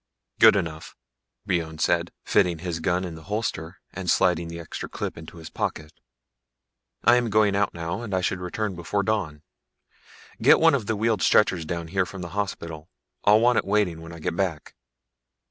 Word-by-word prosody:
_'" - - -38
"Good - - +8
enough," 85 -5 -4 0.5
Brion 85 -5 -1
said, 85 +2 +1
fitting 85 -2 +2
his 85 0 -4
gun 90 +2 0
in 90 -2 -5
the 80 - -10
holster 95 -4 -4
and 95 -2 -4
sliding 85 -1 +2
the 85 0 -7
extra 85 - -7
clips - - -4
into 80 +1 -11
his 80 -1 -10
pocket. 75 -1 -4 1.1
"I'm 120 -1 +4
going 105 -1 +3
out 100 -2 0
now, 85 +5 -4
and 115 -3 -6
I 95 -1 +1
should 90 +1 -1
return 95 +3 -3
before 85 +4 -2
dawn. 95 -9 -2 1.0
Get - - +6
one - - +5
of 100 - -1
the 110 - 0
wheeled 110 +1 0
stretchers 95 -6 +3
down 85 0 -4
here 95 0 0
from 95 -2 -8
the 85 - -6
hospital. 85 -5 -5 0.4
I'll 105 +2 +6
want 120 0 +4
it - - -2
waiting 100 -5 0
when 85 0 -10
I 85 - -9
get 85 +2 -3
back." 85 -5 -2
90 Hz, 185 wpm, -25 LUFS, 85-100 Hz, 1.1 s, Good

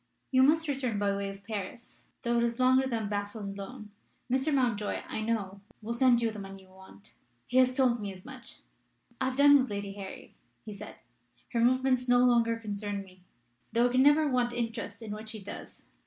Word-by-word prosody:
"You 260 -1 +5
must 315 +4 +4
return 260 -6 -1
by 200 -1 +1
way 200 0 -3
of 195 0 -10
Paris, 215 +3 -7 0.2
though 235 0 +1
it - - +2
is 235 0 -1
longer 260 +1 +4
than 230 -3 -2
by 205 0 -1
Basle 205 +1 -5
and 200 0 -5
Laon. 210 +2 -9 0.4
Mr. 265 +4 +2
Mountjoy, 240 -7 0
I - - -4
know, 205 -3 -2 0.2
will 230 +2 -3
send 240 -1 +4
you 225 - +1
the 215 - -8
money 195 -1 -9
you 190 - -21
want. 190 - -15 0.3
He 250 - -1
has 255 0 +5
told 250 -3 +3
me 200 -1 -4
as 185 -1 -13
much. 260 -3 -11 0.6
'I 260 - 0
have 260 - -6
done 285 0 +7
with 260 - 0
Lady 200 -1 -4
Harry,' 195 -1 -9 0.3
he 215 - -7
said. 205 +1 -9 0.6
'Her 235 - +2
movements 255 +1 +2
no 245 0 +5
longer 230 -2 +3
concern 205 -2 -4
me, 185 -1 -18 0.5
though 240 +1 +4
I - - -5
can 255 +1 +4
never 295 +2 +5
want 250 -3 +1
interest 230 -1 -4
in 215 - -6
what 215 +1 -6
she 220 - -6
does. 200 0 -10
230 Hz, 215 wpm, -30 LUFS, 205-255 Hz, 0.6 s, done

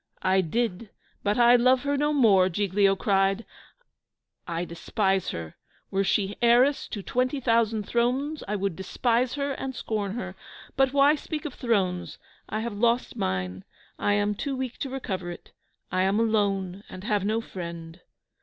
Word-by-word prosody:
"I 190 0 +4
did, 215 +3 -2 0.3
but 205 0 0
I 240 0 +7
love 255 +2 +4
her 285 0 0
no 295 +1 +1
more!" 205 -10 +5
Giglio 195 +1 +2
cries. 195 +1 +1 1.0
"I 170 0 -2
despise 190 +3 -1
her! 80 -1 -6 0.3
Were 195 +1 +1
she 200 0 0
heiress 245 +4 +4
to 205 - -6
twenty 255 +6 0
thousand 230 -3 +2
thrones, 255 +8 0
I 210 - -1
would 195 -3 -1
despise 235 - 0
her 280 -1 -1
and 265 -1 -4
scorn 210 -4 -3
her. 245 - -5 0.4
But 270 -1 +3
why 280 +1 +5
speak 310 +1 -5
of 295 - -4
thrones? 190 -8 -1 0.3
I 215 - -2
have 235 -1 -3
lost 235 +4 +1
mine, 95 0 -2 0.4
I 205 - +2
am 205 0 +1
too 270 +6 -3
weak 260 -2 -4
to 275 - -3
recover 195 -9 -4
it 175 - -10 0.4
I 185 - +1
am 195 +3 +2
alone, 200 -4 0
and 185 - -9
have 210 -2 0
no 215 +3 +1
friend." 170 -4 -8
210 Hz, 165 wpm, -26 LUFS, 190-245 Hz, 1.0 s, I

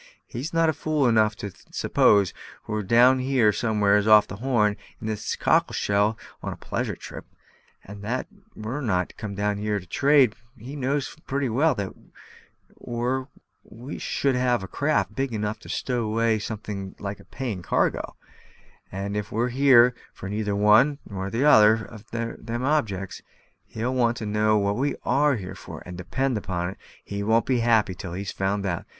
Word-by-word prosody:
"He 120 - -7
is 145 +6 -4
not 165 -1 +2
fool 155 -3 0
enough 110 -2 +3
to 100 -1 -6 0.2
suppose 100 -3 +3 0.3
we're 105 0 -2
down 120 +6 +5
here 130 -4 +3
somewheres 105 -2 +2
off 105 -1 +7
the 100 - -8
Horn, 110 -4 +1 0.2
in - - -8
this 110 -2 -2
cockle - - +2
shell, 105 +2 +1 0.2
on - - -4
a - - -6
pleasure - - -3
trip; - - -10 0.6
and 100 +1 -10
that 120 +5 -2 0.3
we're 115 +7 -4
not 90 -8 -1
come 105 -2 -6
down 100 0 -1
here 105 0 -1
to 90 - -13
trade 135 - +4 0.2
he 120 +4 -9
also 145 - -6
knows 140 +1 -1
pretty 140 -1 -1
well, 135 +4 +2 1.0
or 125 +2 -2 0.4
we 125 +6 -9
should 140 -1 0
have 125 -4 +1
a - - -6
craft 105 - 0
big 135 +1 -2
enough 105 0 -2
to - - -13
stow 125 -2 -1
away 110 0 +1
something 105 -3 -6
like 100 0 -5
a - - -16
paying 120 -9 -5
cargo; - - 0 0.8
and 100 +2 -4
if 105 -1 -3
we're 120 +3 0
here 125 -1 +6 0.2
for 95 - -7
neither 105 0 -2
one 110 +8 +5
nor 95 -1 -4
t'other 110 -3 +6
of 110 0 -13
them 115 +1 -4
objects, 110 -10 -1 0.5
he'll 120 +3 -3
want 120 -2 +2
to 110 - -5
know 105 +1 +2
what 100 0 0
we 140 +3 0
are 140 +2 +3
here 95 -5 -6
for; - - -10
and, 90 - -8
depend 115 +7 -1
upon 90 -2 -3
it, - - -13 0.3
he 100 0 -4
won't 110 +3 +2
be 125 -2 +1
happy 115 -4 +3
till 90 -1 -7
he's 95 +2 -4
found 100 +1 -1
out. 85 -3 -3
110 Hz, 175 wpm, -25 LUFS, 100-125 Hz, 1.0 s, off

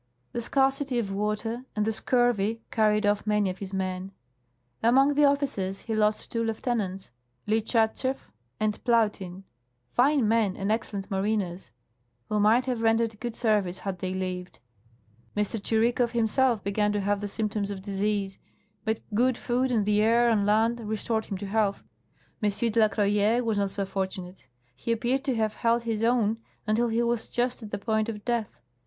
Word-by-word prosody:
The 240 - -3
scarcity 270 +1 +1
of 210 -5 -1
water 210 +4 -2
and 210 -1 +1
the 220 - 0
scurvy 230 -2 +1
carried 215 -1 +2
off 205 +1 +1
many 210 -2 +2
of 185 - -10
his 195 -1 -6
men. 190 0 -3 0.7
Among 270 +5 +5
the 295 +1 +4
officers 270 -10 0
he 225 - -4
lost 215 0 +1
two 230 -1 0
lieutenants 220 - -2 0.2
— 125 +1 -43
Lichat 220 +1 +1
schew 260 0 0 0.4
and 215 0 -1
Plautin, 210 -6 +1 0.5
fine 270 -2 +3
men 220 -3 +2
and 195 +2 -1
excellent 205 -3 -3
mariners 195 - -1 0.3
— 120 0 -45
who 210 - +1
might 220 +5 +4
have 250 -3 -2
rendered 225 -1 +2
good 240 -2 -4
service 205 -6 +1
had 190 -2 -5
they 185 +1 -3
lived. 185 -1 -4 0.8
M. 210 - +4
Tschirikow 230 +3 +1
himself 235 0 +2
began 210 +1 +1
to 205 - 0
have 200 +1 0
the 205 - -2
symptoms 210 -1 -2
of 195 -2 -6
disease, 200 -1 -1 0.4
but 220 0 -1
good 245 +3 +2
food 250 +2 0
and 220 -4 +2
the 210 0 +3
air 235 +2 +4
on 205 -2 +2
land 225 +3 +3
restored 220 0 -2
him 195 - -3
to 200 - -6
health. 200 0 0 0.6
M. 210 - +3
de 230 +2 0
la 215 - +6
Croyere 210 +3 +2
was 220 -3 0
not 200 -1 +1
so 200 0 -2
fortunate; 190 -4 -5 0.3
he 135 - -3
appeared 245 +4 0
to 265 -3 +1
have 220 -1 0
held 230 +1 +1
his 225 -1 -2
own 230 -2 +2 0.3
until 220 +3 +2
he 230 +1 +1
was 235 -1 -1
just 245 +1 -1
at 215 - -8
the 205 - -3
point 220 +2 0
of 210 -2 -6
death. 230 - -2
215 Hz, 180 wpm, -27 LUFS, 200-235 Hz, 0.8 s, la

